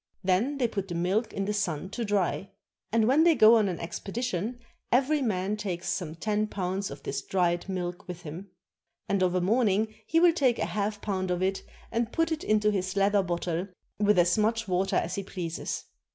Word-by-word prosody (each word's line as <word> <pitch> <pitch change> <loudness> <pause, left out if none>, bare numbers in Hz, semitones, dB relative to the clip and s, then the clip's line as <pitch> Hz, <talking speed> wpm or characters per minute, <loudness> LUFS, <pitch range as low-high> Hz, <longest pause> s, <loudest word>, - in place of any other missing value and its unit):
Then 200 +10 +1
they 250 -3 +2
put 200 -4 -4
the 175 - -5
milk 190 +7 0
in 195 - -2
the 210 - -1
sun 185 -3 -2
to 235 - -3
dry. 200 -2 0 0.4
And 225 0 +3
when 280 +6 +5
they 335 -1 +5
go 220 -1 +7
on 210 -3 +2
an 175 - -3
expedi 195 +7 -5
tion, 235 +1 -2 0.3
every 275 +4 +3
man 205 -3 0
takes 185 -4 -3
some 160 -4 -3
ten 210 +4 0
pounds 190 -1 -2
of 140 - -9
this 135 0 -3
dried 175 +2 0
milk 180 -2 -4
with 175 -1 -7
him. 170 +5 -8 0.6
And 200 -1 +1
of 185 -1 +2
a 180 - +2
morning 215 +1 +2
he 325 - +3
will 345 0 +6
take 260 -8 +2
a - - 0
half 210 0 -2
pound 190 -3 -2
of 180 +1 0
it 190 +1 0 0.3
and 235 0 -1
put 330 0 +1
it 315 - -2
into 210 0 +3
his 190 -1 -2
leather 200 +1 +3
bottle 175 0 -2 0.3
with 210 -1 +3
as 175 +3 +4
much 225 +1 +1
water 185 +1 0
as - - 0
he 200 - -2
pleases. 175 -3 -4
200 Hz, 210 wpm, -28 LUFS, 180-220 Hz, 0.6 s, go